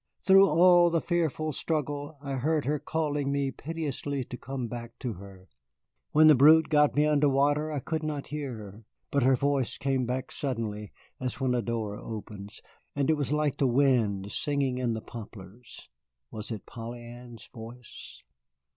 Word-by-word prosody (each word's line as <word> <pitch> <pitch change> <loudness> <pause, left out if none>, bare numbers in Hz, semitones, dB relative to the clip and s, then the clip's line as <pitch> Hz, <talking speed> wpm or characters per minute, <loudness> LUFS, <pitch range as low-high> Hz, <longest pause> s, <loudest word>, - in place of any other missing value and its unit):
Through 195 0 +7
all 175 +2 +6
the 165 0 +1
fearful 160 -2 -1
struggle 145 0 -3
I 140 -1 -3
heard 150 +2 0
her 150 +2 0
calling 145 -3 -1
me 140 -1 0
piteously 145 -2 -4
to 125 - -8
come 130 -1 -5
back 120 0 -8
to 125 -4 -4
her. 95 -1 -13 0.6
When 155 +1 +6
the 155 - +9
brute 155 +4 +6
got 150 -2 +3
me 150 +1 +4
under 150 -1 +3
water 145 +3 +1
I 145 -3 -3
could 160 +4 -3
not 150 -2 -4
hear 140 -5 -4
her, 105 +1 -11 0.3
but 140 - +2
her 130 +1 +4
voice 140 -1 0
came 135 -3 0
back 130 +1 -3
suddenly 110 -6 -4 0.3
(as 130 0 -4
when 130 -2 +1
a 120 - +1
door 110 -2 -3
opens) 105 -2 -8 0.3
and 145 +2 +2
it - - +3
was 145 -2 -2
like 150 -2 0
the 135 - +2
wind 120 -7 +2
singing 140 -3 -1
in 120 -2 0
the 110 - -5
poplars. 110 0 -11 0.4
Was 110 0 -6
it 110 -5 -6
Polly 120 +1 -8
Ann's 120 -1 -11
voice? 115 0 -11
135 Hz, 175 wpm, -28 LUFS, 115-150 Hz, 0.6 s, the